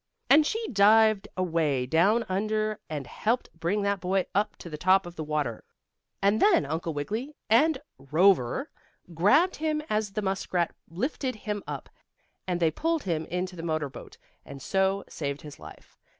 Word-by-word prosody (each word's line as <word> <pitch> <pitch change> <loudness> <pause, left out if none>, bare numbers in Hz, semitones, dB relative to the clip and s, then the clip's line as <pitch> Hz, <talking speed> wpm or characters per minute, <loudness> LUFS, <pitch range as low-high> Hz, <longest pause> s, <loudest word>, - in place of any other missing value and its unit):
And 300 +2 +7
she 450 0 -2
dived 215 -1 +4
away 160 -8 0
down 190 - +3
under 215 +2 -1
and 150 -3 -4
helped 230 - -1
bring 170 +5 -1
that 200 0 0
boy 185 +1 0
up 210 +2 0
to - - -11
the 155 - -6
top 185 +4 +3
of 175 0 -9
the 160 - -4
water, 150 -7 -2 0.6
and 200 +2 +3
then 405 - +5
Uncle 160 +3 -3
Wiggily 220 - -4 0.2
and 295 +6 +5 0.3
Cover 180 - +3 0.4
grabbed 270 - +3
him 305 -1 -1
as 210 -2 0
the 215 - -2
muskrat 185 -3 -1 0.2
lifted 255 - -2
him 210 -1 -4
up, - - -6 0.6
and 180 -1 -1
they 165 -2 +3
pulled 325 - -1
him 160 -3 -2
into 180 +1 -3
the 165 - -7
motor 155 -3 -2
boat, - - -11 0.3
and 140 - -10
so 190 +4 0
saved 140 -1 -5
his 150 -1 -10
life. - - -13
195 Hz, 165 wpm, -27 LUFS, 165-215 Hz, 0.6 s, And